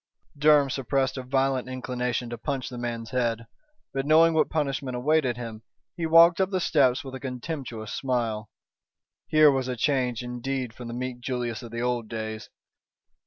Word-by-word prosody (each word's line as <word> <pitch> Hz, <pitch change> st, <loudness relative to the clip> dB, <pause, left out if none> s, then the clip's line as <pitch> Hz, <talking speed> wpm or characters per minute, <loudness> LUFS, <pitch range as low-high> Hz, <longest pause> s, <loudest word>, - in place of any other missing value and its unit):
Durham 145 Hz, -2 st, +4 dB
suppressed 135 Hz, 0 st, 0 dB
a -, -, -3 dB
violent 130 Hz, 0 st, 0 dB
inclination 125 Hz, -1 st, -3 dB
to 120 Hz, -, -4 dB
punch 135 Hz, -4 st, -3 dB
the 125 Hz, -1 st, -7 dB
man's 115 Hz, -1 st, -4 dB
head, 115 Hz, -3 st, 0 dB, 0.5 s
but, 135 Hz, -, -1 dB
knowing 160 Hz, +3 st, +5 dB
what 160 Hz, -, +2 dB
punishment 135 Hz, -4 st, -2 dB
awaited 135 Hz, -2 st, +1 dB
him, 115 Hz, -3 st, -7 dB, 0.3 s
he 165 Hz, -2 st, -2 dB
walked 165 Hz, +2 st, +7 dB
up 190 Hz, -, +2 dB
the 190 Hz, -2 st, 0 dB
steps 135 Hz, -7 st, +3 dB
with 135 Hz, -1 st, -8 dB
a 130 Hz, -, -6 dB
contemptuous 125 Hz, -4 st, -5 dB
smile. 115 Hz, -5 st, -2 dB, 0.8 s
Here 155 Hz, -1 st, +6 dB
was 135 Hz, -2 st, -1 dB
a 125 Hz, -, -2 dB
change 125 Hz, -2 st, 0 dB
indeed 125 Hz, 0 st, -3 dB
from 120 Hz, +1 st, -9 dB
the 120 Hz, -, -5 dB
meek 125 Hz, 0 st, -4 dB
Julius 120 Hz, -2 st, -3 dB
of 120 Hz, -, -9 dB
the 115 Hz, +1 st, -4 dB
old 120 Hz, -2 st, -1 dB
days. 110 Hz, -1 st, -5 dB
130 Hz, 170 wpm, -26 LUFS, 120-140 Hz, 0.8 s, walked